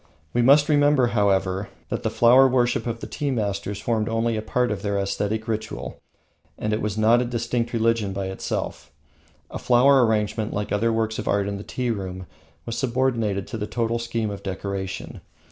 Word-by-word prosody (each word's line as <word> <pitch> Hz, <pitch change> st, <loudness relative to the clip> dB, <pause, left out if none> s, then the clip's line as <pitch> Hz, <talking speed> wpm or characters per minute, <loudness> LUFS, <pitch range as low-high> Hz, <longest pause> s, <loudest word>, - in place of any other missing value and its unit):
We 120 Hz, -, +2 dB
must 140 Hz, +4 st, +6 dB
remember, 145 Hz, -4 st, +4 dB
however, 100 Hz, -2 st, +1 dB, 0.2 s
that -, -, -2 dB
the -, -, -1 dB
flower 125 Hz, +3 st, +6 dB
worship 125 Hz, -1 st, +1 dB
of 115 Hz, 0 st, -4 dB
the -, -, -4 dB
tea 145 Hz, -2 st, -3 dB
masters 100 Hz, -4 st, -2 dB
formed 115 Hz, -2 st, -1 dB
only 115 Hz, 0 st, 0 dB
a 110 Hz, -, -2 dB
part 125 Hz, +2 st, 0 dB
of 100 Hz, -2 st, -3 dB
their 100 Hz, -1 st, -1 dB
aesthetic 100 Hz, +3 st, -2 dB
ritual, 105 Hz, -, -4 dB, 0.6 s
and 105 Hz, 0 st, -2 dB
was 105 Hz, 0 st, -2 dB
not 115 Hz, +3 st, +4 dB
a -, -, -1 dB
distinct 120 Hz, 0 st, -2 dB
religion 115 Hz, -3 st, +1 dB
by 95 Hz, 0 st, -3 dB
itself. 95 Hz, -, -4 dB, 0.6 s
A -, -, -5 dB
flower 130 Hz, +2 st, +5 dB
arrangement, 110 Hz, -1 st, 0 dB
like 105 Hz, 0 st, -2 dB
the -, -, 0 dB
other 115 Hz, +3 st, +1 dB
works 110 Hz, 0 st, -1 dB
of 110 Hz, -, -5 dB
art 100 Hz, -1 st, +1 dB
in 100 Hz, 0 st, -3 dB
the 100 Hz, -, -7 dB
tea 125 Hz, +1 st, -2 dB
room, 95 Hz, -3 st, -5 dB, 0.4 s
was 115 Hz, 0 st, -4 dB
subordinated 115 Hz, -6 st, 0 dB
to 115 Hz, -, -5 dB
the 105 Hz, -, -3 dB
total 115 Hz, 0 st, -1 dB
scheme 115 Hz, -2 st, -2 dB
of 100 Hz, -1 st, -7 dB
decoration. 95 Hz, 0 st, -5 dB
110 Hz, 190 wpm, -24 LUFS, 100-120 Hz, 0.6 s, must